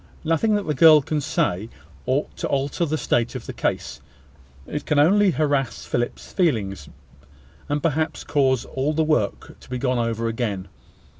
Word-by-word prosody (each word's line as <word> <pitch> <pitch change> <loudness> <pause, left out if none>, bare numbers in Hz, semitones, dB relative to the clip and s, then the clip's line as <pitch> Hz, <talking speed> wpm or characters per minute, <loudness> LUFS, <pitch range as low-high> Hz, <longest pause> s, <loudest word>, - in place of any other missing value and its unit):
Nothing 165 +7 +2
that 205 -1 -1
the 150 - 0
girl 155 +1 +7
can 150 +2 -1
say 115 - -1 0.4
ought 135 +3 -1
to - - -2
alter 140 +4 0
the 155 0 -1
state 120 -5 0
of - - -6
the - - -6
case: - - -3 0.6
it 150 - -4
can 150 - +1
only 195 +7 +5
harass 145 -6 0
Philip's 120 0 -3
feelings, 100 - 0 0.8
and 145 0 -1
perhaps 160 0 -1
cause 130 -4 +1
all 135 +3 -2
the 160 +1 +2
work 150 -10 -1
to - - -17
be 125 - -3
gone 125 -1 0
over 115 0 -1
again. 110 -5 -3
145 Hz, 165 wpm, -23 LUFS, 120-155 Hz, 0.8 s, girl